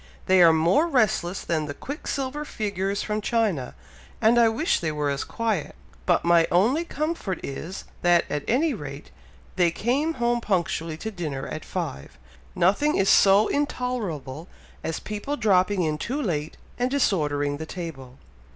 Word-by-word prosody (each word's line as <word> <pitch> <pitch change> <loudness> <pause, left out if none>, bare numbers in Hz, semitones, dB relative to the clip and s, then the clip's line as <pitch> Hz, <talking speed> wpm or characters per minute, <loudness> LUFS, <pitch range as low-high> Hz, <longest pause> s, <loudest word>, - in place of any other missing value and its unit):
They 185 -1 +5
are 170 -1 +8
more 170 - +3
restless 215 - +1
than 155 -3 -1
the 145 - -5
quicksilver 280 0 -4
figures 200 -6 -2
from 210 0 -2
China, 205 - 0 0.4
and 230 +2 +4
I 230 -1 +6
wish 250 +10 +1
they 160 -2 -1
were 150 -1 -1
as 140 - -2
quiet, 220 -8 -2 0.3
but - - +2
my 170 -1 +5
only 235 - +3
comfort 305 - -3
is, 165 +7 -6 0.2
that 175 -1 +4
at 150 -1 -3
any 285 +6 +2
rate 145 - -8 0.5
they 175 -2 +4
come 270 - 0
home 240 0 +1
punctually 170 -5 -1
to 220 +6 -5
dinner 155 -8 -4
at - - -6
five. 70 -1 -5 0.4
Nothing 205 - +2
is 195 - +2
so 200 +2 +6
intolerable 200 - -3 0.4
as 160 0 -3
people 215 +8 -4
dropping 195 -3 +2
in 155 -1 -1
too 265 +5 -3
late 160 - -2 0.2
and 250 +1 +1
disordering 145 - +1
the 160 +1 -7
table." 135 -9 -7
190 Hz, 155 wpm, -25 LUFS, 160-240 Hz, 0.5 s, are